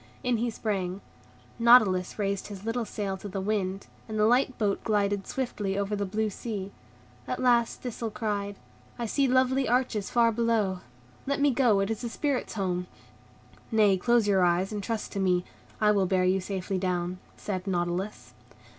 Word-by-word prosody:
In 250 -2 +1
he 235 +2 0
sprang. 195 -4 -2 0.6
Nautilus 220 -6 +5
raised 200 -2 -1
his 205 -1 -9
little 230 +1 -1
sail 200 -2 -3
to 200 - -8
the 195 +1 -4
wind, 195 -1 -1 0.2
and 215 - -3
the 210 - +4
light 250 +3 +3
boat 205 -3 0
glided 205 -2 0
swiftly 205 -7 -2
over 200 +1 -1
the 200 -1 -2
blue 215 +2 -1
sea. 200 -2 -5 0.6
At - - -3
last 240 -2 +2
Thistle 235 -2 -4
cried, 205 -2 -3 0.4
"I 235 - -2
see 275 +5 +1
lovely 260 0 +2
arches 245 -4 +1
far 235 -1 +4
below; 220 -5 +1 0.5
let 280 0 0
me 285 0 +4
go, 240 -6 +3
it 195 +2 -1
is 220 - -3
the 240 - -3
Spirits' 275 0 -2
home." 180 -3 -1 0.8
"Nay, 210 -3 +5
close 235 +3 +2
your 195 -2 +4
eyes, 180 +3 +2
and 210 -1 -3
trust 220 +2 -3
to 200 - -3
me. 180 -2 +2 0.3
I 210 -1 +4
will 195 -3 +2
bear 185 0 +2
you 185 +1 +2
safely 190 0 -3
down," 180 -1 -2 0.2
said 190 -1 -4
Nautilus. 180 +2 -2
205 Hz, 175 wpm, -28 LUFS, 190-230 Hz, 0.8 s, Nautilus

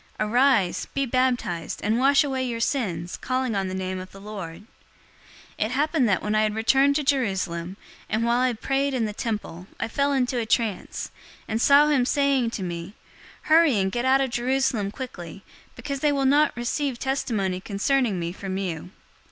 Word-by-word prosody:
Arise, 225 -3 +2
be 275 0 +1
baptized, 250 -9 -1
and 220 +3 +1
wash 275 +2 +5
away 265 -2 -2
your 240 -2 -3
sins, 185 - -2
calling 255 -2 -1
on 195 -1 0
the 185 - -4
name 185 0 -3
of 185 0 -9
the 195 - -12
Lord.' 195 -5 -7 1.0
022:017 - - +2
"It 220 - -4
happened 290 -2 +2
that, 190 - +1
when 210 - -1
I 215 - +3
had 215 -1 0
returned 270 +5 +3
to 300 - +1
Jerusalem, 190 -9 -1 0.3
and 220 +1 0
while 235 +1 +2
I 255 -1 +2
prayed 270 +4 -1
in 235 -3 0
the 210 - -4
temple, 205 -5 -4
I - - -1
fell 280 +5 0
into 255 -2 0
a 230 - -2
trance, 220 -4 -1 0.3
022:018 - - -27
and 220 +1 -1
saw 285 +3 +6
him 280 -5 +3
saying 275 -4 +2
to 215 -4 -5
me, 175 +3 -5 0.5
'Hurry 315 -6 +5
and 190 -1 +1
get 240 +3 -2
out 265 +1 +4
of 265 -2 -1
Jerusalem 240 -4 0
quickly, 195 -6 -8 0.3
because 280 -2 -5
they 295 +1 +2
will 275 -1 0
not 290 +1 +3
receive 250 +2 -2
testimony 215 -9 -1
concerning 215 +1 0
me 170 0 -3
from 190 +1 -5
you.' 175 -3 -4
235 Hz, 190 wpm, -25 LUFS, 195-270 Hz, 1.0 s, saw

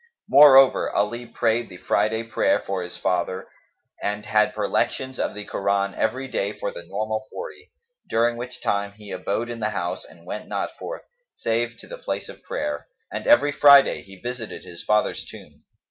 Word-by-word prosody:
Moreover, 135 -2 +7
Ali 120 +4 -1
prayed 115 0 0
the 90 - -10
Friday 110 +4 +1
prayer 115 - +2
for 95 -1 -3
his 90 0 -7
father 90 +1 -1 0.5
and 105 +1 -2
had 105 -1 +2
perlections 130 0 -1
of - - -1
the 105 0 -7
Koran 100 0 0
every 130 +4 -1
day 105 -5 -2
for 100 - -4
the - - -8
normal 110 +4 -3
forty, 440 -3 -8 0.4
during 120 +1 +2
which 125 +1 -8
time 100 0 0
he 105 -1 -12
abode 100 +5 -2
in 120 -1 -6
the 105 -1 0
house 90 -3 -3
and 85 - -17
went 105 +4 -6
not - - -3
forth, - - -6 0.3
save 115 0 -1
to - - -13
the - - -8
place - - -4
of - - -11
prayer; 75 0 -4 0.2
and - - -5
every 145 0 +6
Friday 140 -1 +7
he 95 0 -14
visited 120 -1 -6
his 85 -1 -10
father's 105 0 +1
tomb. - - -14
110 Hz, 175 wpm, -24 LUFS, 100-120 Hz, 0.5 s, Moreover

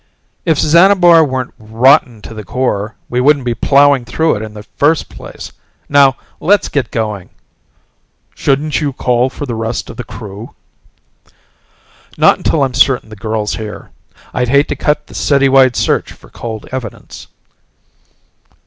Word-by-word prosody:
"If 160 -4 +2
Xanabar 170 +1 +5
weren't 130 -3 -3
rotten 115 +1 +2
to - - -9
the 110 -1 -8
core, 105 -1 -2
we 125 +1 -1
wouldn't 140 -1 +3
be 120 - 0
plowing 140 +2 +3
through 160 +7 0
it 105 - -5
in 110 -1 -8
the 105 - -9
first 150 +8 0
place. - - -10 0.4
Now, 140 -2 +4 0.2
let's 200 -1 +2
get 130 -7 -2
going." 105 -5 -4 1.0
"Shouldn't 145 +3 0
you 145 -2 -2
call 125 0 +1
for 145 - -7
the 125 - -4
rest 115 +1 -4
of 115 - -14
the 125 - -5
crew?" 110 -1 -10 1.6
"Not - - +4
until 150 - +1
I'm 130 -2 -1
certain 125 -2 +2
the 110 - -10
girl's 110 0 -3
here. 105 -1 -8 0.4
I'd 125 -1 -1
hate 140 +3 +3
to - - -2
cut 150 0 -1
the - - -16
city 140 -1 +2
wide 130 -2 +4
search - - 0
for - - -19
cold 110 -2 -7
evidence." 130 -2 -8
130 Hz, 155 wpm, -14 LUFS, 110-145 Hz, 1.6 s, Xanabar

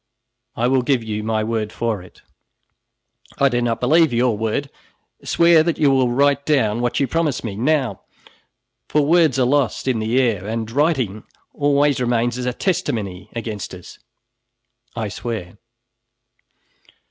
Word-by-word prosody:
I 120 - +1
will 130 0 +2
give 125 -1 0
you 105 -1 -4
my 110 0 0
word 110 -1 -2
for 115 -5 -2
it." 90 - -17 1.1
"I 140 - +4
do 120 -1 0
not 115 -1 -1
believe 155 +4 +3
your 120 -1 +1
word. 110 +6 -2 0.5
Swear 170 -1 +4
that 165 +1 0
you 145 -3 +3
will 130 -2 +2
write 140 +3 +2
down 120 -7 +1
what 120 -1 0
you 140 - +2
promise 160 -4 -1
me, 110 -4 -4
now, 130 -3 0 0.9
for 150 - +2
words 160 -3 +3
are 130 - +3
lost 135 0 0
in 125 -4 +1
the 110 +4 +1
air, 110 -7 0
and 110 0 -3
writing 130 - 0 0.3
always 145 -1 +2
remains 120 0 0
as 125 - -3
a - - +1
testimony 110 - -2
against 110 -5 -5
us." 90 - -13 1.0
"I 115 -2 -2
swear!" 105 -2 -6
120 Hz, 150 wpm, -20 LUFS, 110-140 Hz, 1.1 s, I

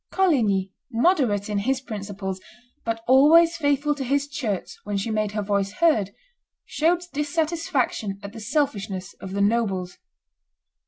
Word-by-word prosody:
Coligny, 220 - +2 0.2
moderate 235 - +2
in 210 -1 -1
his 260 +6 0
principles, 200 -5 -6 0.4
but 225 0 -3
always 320 +6 +6
faithful 290 -1 +1
to 285 -2 -5
his 280 +2 0
church 230 -9 -3
when 205 -1 -2
she 200 +3 -2
made 215 -1 -1
her 210 -1 -1
voice 200 0 0
heard, 225 - +2 0.6
showed 340 +3 +1
dissatisfaction 295 - -1
at 200 +1 -8
the 230 - -8
selfishness 210 -7 -2
of 190 - -7
the 200 - -1
nobles. 200 -4 0
225 Hz, 140 wpm, -24 LUFS, 200-290 Hz, 0.6 s, always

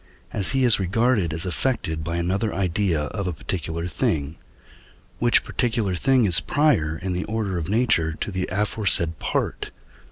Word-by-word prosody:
as 100 +4 +1
he 135 -1 +2
is 120 -4 +4
regarded 100 -1 +1
as 80 +4 -3
affected 90 -5 -1
by 85 +2 -2
another 95 +5 -1
idea 90 -3 0
of 100 +5 -4
a 90 - -1
particular 80 +2 -4
thing, 80 -3 -1 0.8
which 120 0 +3
particular 115 -6 -1
thing 130 +6 +3
is 90 -4 +5
prior 135 - +1
in 90 +3 -3
the 90 - -2
order 110 -4 -2
of 80 +1 -5
nature 110 -8 +2
to 80 - -4
the 95 -1 -3
aforesaid 95 -5 +1
part - - -2
(II. - - -12
95 Hz, 165 wpm, -23 LUFS, 85-110 Hz, 0.8 s, is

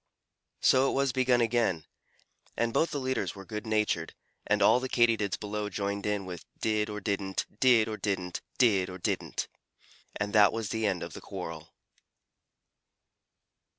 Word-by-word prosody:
So 130 +1 +5
it - - -2
was 135 -1 +2
begun 125 -1 +3
again, 110 -8 +1 0.7
and 115 0 0
both 165 - +2
the 145 - -3
leaders 130 -4 -2
were 95 -1 -10
good 105 +3 -6
natured, 105 -7 0 0.3
and 105 -1 +3
all 125 - +6
the 130 0 -4
Katydids 115 -5 +2
below 105 0 -3
joined 100 0 -3
in 105 -2 -1
with 90 -2 -7 0.2
"did 110 -1 0
or 105 0 -4
didn't, 100 -1 -2
did 120 -4 +5
or 110 -1 -4
didn't, 95 -4 -2 0.2
did 100 -7 +3
or 90 - -7
didn't." 90 - -2 0.7
And 105 -1 -3
that 105 -2 +6
was 115 -2 -3
the 110 -1 0
end 95 -3 -1
of 85 - -7
the - - -8
quarrel. 80 0 -7
105 Hz, 160 wpm, -29 LUFS, 100-115 Hz, 0.7 s, all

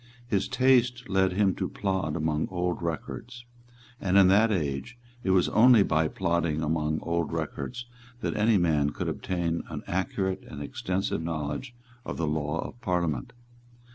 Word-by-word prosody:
His 105 -5 0
taste 125 -1 +3
led 95 -1 +2
him 95 0 +3
to - - -2
plod 95 -6 -1
among 80 -1 0
old 90 -1 -2
records; 120 - -5 0.6
and 95 0 +2
in 95 -2 +7
that 110 +4 +5
age 80 - -2 0.3
it 95 - -1
was 95 -1 +4
only 115 -1 +6
by 80 -3 +2
plodding 85 -1 0
among 80 0 0
old 85 -1 -1
records 85 +9 -4 0.4
that - - -2
any 110 0 +4
man 75 -5 +2
could - - -4
obtain 85 -2 -2
an - - -6
accurate 95 0 -1
and 70 - -8
extensive 90 +5 -2
knowledge 80 - -4 0.3
of - - -5
the 85 - 0
law 75 +1 -1
of 120 - -13
Parliament. 85 -8 -1
90 Hz, 155 wpm, -28 LUFS, 80-105 Hz, 0.6 s, in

